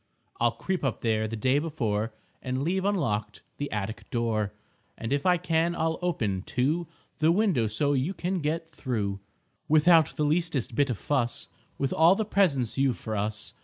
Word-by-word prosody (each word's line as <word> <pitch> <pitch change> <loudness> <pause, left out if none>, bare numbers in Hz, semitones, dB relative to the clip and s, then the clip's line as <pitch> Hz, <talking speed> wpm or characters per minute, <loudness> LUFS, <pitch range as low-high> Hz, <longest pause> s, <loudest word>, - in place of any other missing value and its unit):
I'll 120 -1 +3
creep 190 -3 -3
up 135 -4 -1
there 110 -1 +1
the 115 - -4
day 130 +5 +2
before 115 -9 -1 0.3
And 130 +1 -2
leave 185 +4 0
unlocked 105 - -1
the 145 0 -4
attic 105 +1 -4
door; 115 -4 0 0.5
And 115 +4 -3
if 140 +4 0
I 180 -1 +5
can 170 0 +1
I'll 160 0 0
open, 110 - -1
too, 150 - 0 0.3
The 155 +1 +4
window 175 - +2
so 140 +7 +1
you 140 +8 0
can 180 +2 -1
get 160 +2 -2
through 105 -10 -2 0.5
Without 155 +1 +5
the 150 - 0
leastest 150 -6 0
bit 140 +4 +2
of 120 - -1
fuss 125 -2 -1 0.3
With 135 - -1
all 165 +4 +6
the 220 - -1
presents 140 - +1
you've 135 -3 +2
for 110 - -4
us. 105 +1 -2
140 Hz, 175 wpm, -27 LUFS, 110-165 Hz, 0.5 s, all